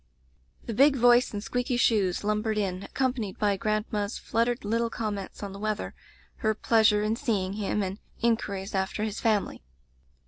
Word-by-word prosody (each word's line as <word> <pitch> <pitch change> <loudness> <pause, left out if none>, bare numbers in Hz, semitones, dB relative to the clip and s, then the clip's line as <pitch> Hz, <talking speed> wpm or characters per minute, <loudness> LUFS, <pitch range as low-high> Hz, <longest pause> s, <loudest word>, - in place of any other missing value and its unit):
"The 230 - -4
big 275 +5 +5
voice 245 0 +5
and 205 -1 -5
squeaky 245 +1 -1
shoes 205 -7 +2
lum 210 0 +1
bered 220 -1 -1
in, 190 -3 -1
accompanied 250 -5 -2
by 205 -2 +2
grandma's 215 0 -1
flut 230 +1 0
tered 245 0 -2
little 230 +2 0
comments 210 -4 -5
on 200 -1 -5
the 200 - -9
weather, 215 0 -2 0.4
her 220 -2 0
pleasure 215 -1 +3
in 215 +1 +1
seeing 195 -5 -1
him, 205 0 -1
and 195 +2 -4 0.2
inquiries 210 -4 -1
after 190 +2 -1
his 215 -1 -3
family. 215 - 0
215 Hz, 170 wpm, -27 LUFS, 200-230 Hz, 0.4 s, big